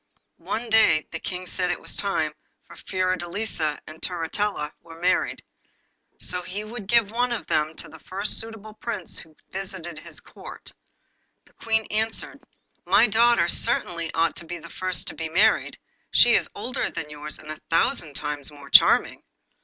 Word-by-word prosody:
One 235 +2 -3
day 220 -8 +5
the 165 - -4
King 180 +1 -5
said 180 0 -1
that - - +2
it - - -7
was - - -5
time 160 -6 -1 0.5
Fiordelisa 185 -3 -1
and 155 +1 -12
Turritella 175 -2 -1
were 165 0 -13
married, 180 +2 +1 0.8
so 180 0 0
he 185 +4 -4
would 215 -2 -8
give 230 -2 +4
one 245 +2 +1
of 240 - -3
them 155 +1 0
to - - -5
the 160 - -13
first 195 +5 +2
suitable 225 -1 -3
Prince 215 -4 -3
who 160 -1 -12 0.2
visited 185 -4 -5
his 155 -1 -8
Court. - - -12 0.7
The - - -25
Queen 220 -1 0
answered: 220 +1 -1 0.4
'My - - +5
daughter 230 -4 +4
certainly 170 -1 +2
ought 165 0 +2
to 170 - -7
be 175 +1 -4
the 170 0 -12
first 185 -1 -1
to - - -7
be 160 -1 -5
married; 205 +7 +3 0.3
she - - +6
is - - +3
older 255 +2 -2
than 150 -1 -6
yours, 150 0 -6
and 155 - -9
a 155 - -8
thousand 160 -2 +1
times 145 -1 -2
more 145 -1 -13
charming! - - +6
180 Hz, 170 wpm, -25 LUFS, 160-215 Hz, 0.8 s, she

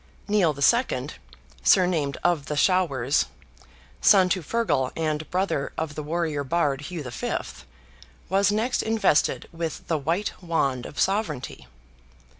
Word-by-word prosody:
Nial 185 -8 +2
II. 140 - +2 0.5
(surnamed 170 -7 +3
of 165 -4 +1
the 150 - -3
Showers), 145 -7 +2 0.7
son 190 -3 +6
to 185 0 0
FEARGAL 160 - 0
and 155 -1 -2
brother 185 -6 -1
of 160 -2 -3
the 150 - -5
warrior 155 -1 -2
Bard, 145 -2 0
Hugh 160 +1 -6
V., 120 - -3 0.9
was 195 +2 +3
next 225 +4 0
invested 220 -8 +1
with 165 -1 -5
the 160 -2 +1
white 170 +8 -1
wand 140 -8 -1
of - - -9
sovereignty. 175 - -1
165 Hz, 125 wpm, -25 LUFS, 145-185 Hz, 0.9 s, son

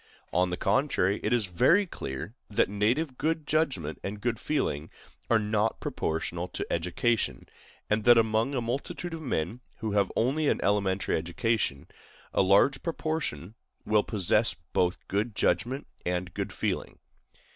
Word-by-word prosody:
On 90 +1 +3
the 90 - -2
contrary, 105 -8 +1
it 105 - -1
is 120 -4 +3
very 130 - +4
clear 80 - -6 0.2
that 105 - +2
native 125 +7 0
good 160 0 0
judgment 135 - 0
and 100 +1 -4
good 115 0 -1
feeling 80 - -1 0.4
are 115 - +5
not 105 0 0
proportional 85 +2 -2
to - - -4
education, 90 +7 0 0.4
and 105 0 +1
that 120 -1 +8
among 110 +4 +2
a 125 - 0
multitude 135 +8 -4
of 165 - -5
men 110 - -2 0.2
who 110 -2 -3
have 100 -2 +2
only 140 +6 +1
an - - +2
elementary 100 -1 +1
education, 85 -3 -1 0.5
a - - +3
large 100 +9 +4
proportion 155 - -3 0.3
will 105 -1 +4
possess 105 +2 +3 0.2
both 90 0 +2
good 105 +3 -1
judgment 130 +6 0 0.2
and 90 0 -2
good - - -3
feeling. - - -3
110 Hz, 145 wpm, -28 LUFS, 90-130 Hz, 0.5 s, that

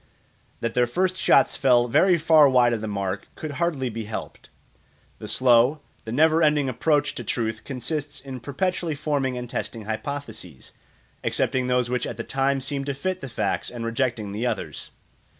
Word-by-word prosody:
That 115 0 -1
their 125 -1 +3
first 185 +9 0
shots 190 - +4
fell 125 -3 +4
very 180 +9 +4
far 155 -3 +6
wide 125 -2 +4
of 110 - -2
the 110 - -3
mark 100 -1 -3
could 155 - -5
hardly 145 -4 -1
be 115 -2 -5
helped. 110 - -7 0.7
The 105 - -7
slow, 125 +5 +4 0.3
the 110 - -5
never 160 +5 +4
ending 150 -3 +3
approach 145 +3 +1
to - - -6
truth 110 -4 -2
consists 145 +2 -4
in 135 -1 -8
perpetually 165 +5 -2
forming 140 -3 -1
and 125 0 -5
testing 115 -1 -5
hypotheses, 110 - -6 0.5
accepting 130 -1 0
those 125 -1 +2
which 125 0 -1
at - - -6
the - - -4
time 135 0 0
seem 135 +1 -3
to 140 -1 -2
fit 185 +6 -3
the 135 - -6
facts 115 - -2
and 120 -1 -6
rejecting 115 -3 -1
the 110 +5 -2
others. - - -4
130 Hz, 175 wpm, -24 LUFS, 115-145 Hz, 0.7 s, far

